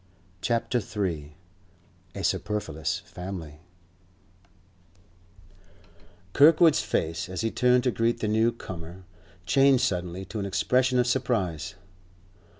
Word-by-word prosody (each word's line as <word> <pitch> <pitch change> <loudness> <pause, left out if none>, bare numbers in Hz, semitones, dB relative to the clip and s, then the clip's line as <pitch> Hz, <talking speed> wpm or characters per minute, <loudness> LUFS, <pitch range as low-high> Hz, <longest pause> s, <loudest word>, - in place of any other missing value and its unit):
CHAPTER 120 +1 0
III 85 -8 -4 0.8
A - - -5
SUPERFLUOUS 80 -8 -2
FAMILY 90 -5 -8 2.7
Kirkwood's 160 +1 +6
face, 85 +3 -2
as 95 +2 -4
he 115 0 -1
turned 125 0 +3
to 125 - +2
greet 115 +1 0
the 110 - -1
new 110 +2 +2
comer, 90 -4 -9 0.4
changed 135 +5 +4
suddenly 90 0 -2
to 110 +3 -6
an 100 - -2
expression 125 +6 +1
of 125 - +3
surprise. 105 - -1
105 Hz, 105 wpm, -26 LUFS, 90-125 Hz, 2.7 s, Kirkwood's